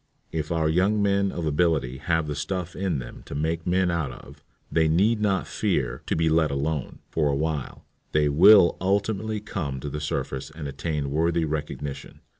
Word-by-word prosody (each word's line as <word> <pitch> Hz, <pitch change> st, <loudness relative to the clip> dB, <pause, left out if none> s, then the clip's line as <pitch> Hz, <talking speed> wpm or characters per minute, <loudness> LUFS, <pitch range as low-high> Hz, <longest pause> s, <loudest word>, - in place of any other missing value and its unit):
If 80 Hz, -1 st, -3 dB
our 80 Hz, -2 st, +1 dB
young 95 Hz, +7 st, +2 dB
men 100 Hz, -1 st, +2 dB
of 85 Hz, -, -4 dB
ability 75 Hz, -5 st, +1 dB
have 80 Hz, +1 st, 0 dB
the 75 Hz, -, -3 dB
stuff 90 Hz, +5 st, -4 dB
in 95 Hz, -5 st, -1 dB
them -, -, -8 dB
to -, -, -6 dB
make 80 Hz, +3 st, -2 dB
men 90 Hz, 0 st, +2 dB
out 80 Hz, -5 st, -1 dB
of, -, -, -13 dB, 0.3 s
they 80 Hz, -1 st, +3 dB
need 105 Hz, +8 st, +3 dB
not 100 Hz, -2 st, +1 dB
fear 70 Hz, -, -1 dB
"to -, -, 0 dB
be 80 Hz, 0 st, +1 dB
let 80 Hz, -1 st, +3 dB
alone" 70 Hz, +1 st, -2 dB
for 75 Hz, -2 st, +1 dB
a 70 Hz, -, +1 dB
while; 75 Hz, -2 st, -3 dB, 0.3 s
they 75 Hz, -1 st, +3 dB
will 85 Hz, +5 st, +7 dB
ultimately 100 Hz, +3 st, 0 dB
come 80 Hz, -10 st, -4 dB
to 70 Hz, +2 st, -5 dB
the 75 Hz, -, -4 dB
surface 70 Hz, -2 st, -3 dB
and 75 Hz, -1 st, -7 dB
attain 70 Hz, 0 st, -3 dB
worthy 85 Hz, +2 st, +1 dB
recognition.' 75 Hz, -2 st, -5 dB
80 Hz, 185 wpm, -25 LUFS, 75-95 Hz, 0.3 s, will